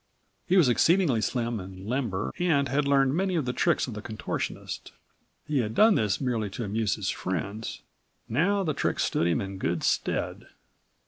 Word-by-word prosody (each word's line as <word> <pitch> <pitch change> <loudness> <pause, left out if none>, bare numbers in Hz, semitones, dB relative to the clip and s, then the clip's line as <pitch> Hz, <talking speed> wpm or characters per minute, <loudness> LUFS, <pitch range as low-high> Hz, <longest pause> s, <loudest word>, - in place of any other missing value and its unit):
He 190 - +4
was 170 -7 +6
exceedingly 145 - +3
slim 120 -1 -1
and 95 0 -9
limber 115 -6 -2
and 155 -6 +2
had 140 +3 0
learned 135 -1 +3
many 185 +2 0
of 155 -5 0
the 125 - -1
tricks - - +2
of 125 - -6
the 105 - -6
contortionist. 110 -1 -5 0.5
He 150 -2 0
had 110 -2 -2
done 220 0 +6
this 105 - +1
merely 120 -6 -1
to 120 - -2
amuse 105 0 0
his 100 -2 -3
friends. 100 +5 -4 0.4
Now 195 - +2
the 155 -4 0
tricks - - 0
stood 85 - +1
him 85 - +2
in 95 -1 -5
good 85 -3 -1
stead. - - -1
120 Hz, 180 wpm, -27 LUFS, 105-150 Hz, 0.5 s, was